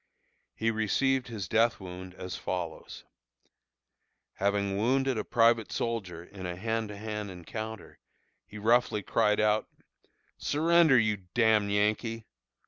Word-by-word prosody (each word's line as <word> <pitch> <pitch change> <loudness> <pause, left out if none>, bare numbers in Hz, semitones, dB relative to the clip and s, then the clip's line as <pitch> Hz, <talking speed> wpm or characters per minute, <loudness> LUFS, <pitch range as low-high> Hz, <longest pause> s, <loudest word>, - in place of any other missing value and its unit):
He 115 0 0
received 125 +5 +1
his 110 -6 -5
death 115 0 +2
wound 90 0 -9
as 90 0 -6
follows: 85 -3 -5 1.3
having 100 0 0
wounded 130 +5 +1
a 110 - -2
private 115 -1 +3
soldier 95 -8 -3
in 95 0 -8
a 90 - -4
hand 110 +3 -2
to 105 - -8
hand 105 -1 -5
encounter, 110 +3 -7 0.5
he 105 - -10
roughly 110 -1 +2
cried 105 +2 +2
out, 105 0 +2 0.7
"Surrender, 160 -1 +4
you 110 -2 +2
d 95 -2 -24
d 120 - +2
Yankee!" 110 +1 +1
110 Hz, 130 wpm, -29 LUFS, 100-115 Hz, 1.3 s, Surrender